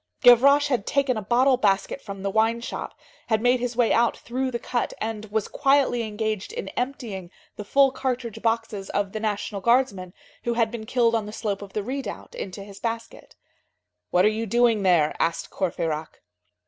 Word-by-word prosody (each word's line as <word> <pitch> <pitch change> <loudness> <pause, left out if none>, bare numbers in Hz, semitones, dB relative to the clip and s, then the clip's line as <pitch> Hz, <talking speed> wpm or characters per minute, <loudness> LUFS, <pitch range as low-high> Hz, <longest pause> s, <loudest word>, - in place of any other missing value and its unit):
Gavroche 280 +4 +7
had 245 -7 0
taken 275 -2 +1
a 215 - -3
bottle 250 +5 +3
basket 200 +4 +1
from 195 -2 -8
the 200 - -1
wine 225 +2 +2
shop, 235 - -6 0.3
had 220 -1 +2
made 245 +2 +3
his 245 -1 -3
way 240 -2 +3
out 235 0 +2
through 260 +2 -3
the 240 - -2
cut, 240 +1 -2
and 215 -1 -4
was 215 0 -2
quietly 275 -4 +2
engaged 215 - -3
in 475 +1 -5
emptying 240 -9 -4 0.3
the 210 - -6
full 275 +6 +4
cartridge 250 -4 -3
boxes 225 -4 -1
of 200 -1 -1
the 215 - -4
National 210 -1 -2
Guardsmen 235 -7 +2 0.3
who 235 0 -1
had 230 -2 +2
been 220 -2 -7
killed 235 -2 +2
on 220 -2 0
the - - -6
slope 210 -2 -3
of 200 -1 -10
the 210 - -2
redoubt, 270 +5 -5
into 195 +1 -6
his 200 -1 -12
basket. 230 0 -5 0.7
"What 180 +2 +3
are - - +6
you 220 +1 -3
doing 235 0 +3
there?" 175 -6 +3
asked 165 - -1
Courfeyrac. 160 -4 -3
225 Hz, 185 wpm, -25 LUFS, 205-245 Hz, 0.7 s, Gavroche